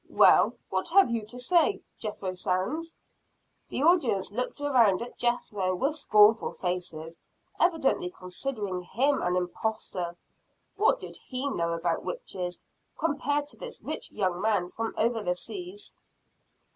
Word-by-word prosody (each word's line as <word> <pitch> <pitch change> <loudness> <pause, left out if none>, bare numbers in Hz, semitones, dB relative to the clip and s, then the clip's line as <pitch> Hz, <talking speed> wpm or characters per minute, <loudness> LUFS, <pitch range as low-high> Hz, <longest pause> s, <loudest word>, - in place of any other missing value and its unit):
"Well, - - +6 0.2
what - - -1
have 385 -6 +5
you 225 -2 -2
to 245 - -8
say, 345 +9 +2 0.2
Jethro 205 -4 -4
Sands?" 195 - -2 0.7
The 270 - -1
audience 295 - +3
looked 250 +6 -3
around 245 -10 +4
at 245 - -9
Jethro 210 -6 0
with 275 - 0
scornful 215 -6 +5
faces, 175 -3 -3 0.4
evidently 320 - +2
considering 185 +1 -4
him 265 +10 +1
an 180 0 +1
imposter. 180 -1 -2 0.6
What 435 +4 +3
did - - -7
he 260 +2 -1
know 170 -5 0
about 165 0 -1
witches 185 - -4 0.4
compared 290 -2 0
to - - -5
this - - -8
rich - - -4
young 185 -3 -1
man 205 -5 +1
from 225 +4 -4
over 230 0 +1
the 180 -3 0
seas? 375 - -7
220 Hz, 135 wpm, -28 LUFS, 180-285 Hz, 0.7 s, Well